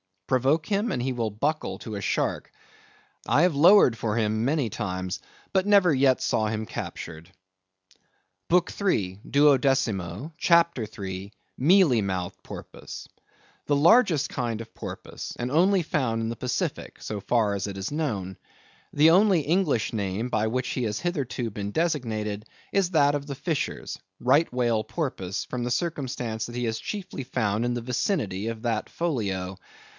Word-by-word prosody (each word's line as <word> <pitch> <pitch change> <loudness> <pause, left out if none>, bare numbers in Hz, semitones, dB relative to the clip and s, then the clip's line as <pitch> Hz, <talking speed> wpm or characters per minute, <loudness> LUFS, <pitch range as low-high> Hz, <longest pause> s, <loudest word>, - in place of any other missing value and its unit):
Provoke 135 - +2
him, 210 +3 0
and 120 - -1
he 130 - 0
will 115 -3 -1
buckle 145 +9 -2
to 110 -3 -6
a 100 - -4
shark. - - -1 0.8
I 130 +6 +4
have 175 -1 +4
lowered 150 - +6
for 110 -1 -1
him 110 0 +1
many 140 -3 +1
times, 95 -4 -3 0.3
but 190 0 +1
never 200 -5 +5
yet 130 -1 +3
saw 110 - +1
him 110 0 -2
captured. 80 -4 -7 1.2
BOOK 180 +1 +3
III. 100 - 0
(Duodecimo), 135 - +2
CHAPTER 170 -10 +3
III. 95 -1 -7 0.2
(Mealy 155 - +5
mouthed 95 -3 -3
Porpoise).—The 145 - -8
largest 170 - +4
kind 115 -2 -2
of 115 - -11
Porpoise; - - -7
and 120 +1 -3
only 180 +4 +4
found 120 -7 0
in 115 - -2
the 115 - -4
Pacific, 125 0 -3
so 105 - -4
far 110 0 +1
as 100 0 -2
it 100 -1 -6
is 95 +5 -4
known. 105 - -2 0.6
The 150 +2 +6
only 190 -1 +5
English 150 - +1
name, 105 +2 -2
by 110 -2 +1
which 130 +3 -1
he 125 - -2
has 105 -2 -2
hitherto 135 -9 -2
been 100 0 -4
designated, 110 -10 -1 0.3
is 195 -3 +1
that 145 -3 +4
of 145 0 -4
the 140 - -4
fishers—Right 135 - -1
Whale 120 -3 +1
Porpoise, 110 - -3
from 125 -1 -4
the - - -1
circumstance 125 -8 -2
that 120 - -8
he 125 0 -1
is 110 -1 -2
chiefly 185 -10 -5
found 110 -2 0
in 120 - 0
the 120 - -3
vicinity 115 - -1
of 115 -1 -4
that 115 -3 -1
Folio. 100 - -2
125 Hz, 155 wpm, -26 LUFS, 110-155 Hz, 1.2 s, lowered